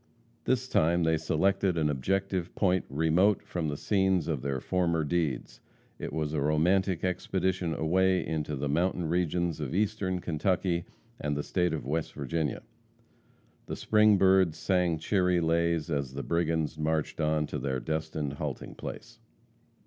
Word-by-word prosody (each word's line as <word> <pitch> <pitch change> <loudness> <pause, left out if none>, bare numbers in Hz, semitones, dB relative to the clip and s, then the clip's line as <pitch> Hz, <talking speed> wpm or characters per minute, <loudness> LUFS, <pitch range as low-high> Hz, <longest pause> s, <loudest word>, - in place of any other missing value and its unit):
This 130 0 +1
time 85 -4 +2
they 80 0 +3
selected 90 +4 +1
an 75 -2 +2
objective 90 +5 -1
point 95 -2 +2
remote 80 +8 +2
from 85 -3 -3
the 75 -1 -3
scenes 95 -4 +1
of 75 -6 -1
their 70 0 -2
former 85 0 0
deeds. 75 -7 -2 0.4
It - - -5
was 75 -1 -2
a 75 - 0
romantic 85 +5 +2
expedition 90 -1 -1
away 95 +3 +2
into 75 -1 -2
the 70 +1 -2
mountain 85 +4 0
regions 85 -1 0
of 75 +1 -3
Eastern 100 -3 0
Kentucky 85 +1 0 0.3
and 75 0 -2
the 75 - -2
state 90 -2 0
of 80 -4 -3
West 80 +3 -2
Virginia. 75 +1 -2 1.0
The - - -4
spring 105 -1 +4
birds 95 -3 +4
sang 90 -3 +1
cheery 90 +1 +1
lays 85 -1 +1
as 70 -3 -2
the 70 - -4
brigands 80 -2 -1
marched 80 0 -1
on 75 0 +1
to - - -4
their 65 -2 -2
destined 80 -1 -3
halting 70 -2 -5
place. - - -8
85 Hz, 150 wpm, -29 LUFS, 75-95 Hz, 1.0 s, spring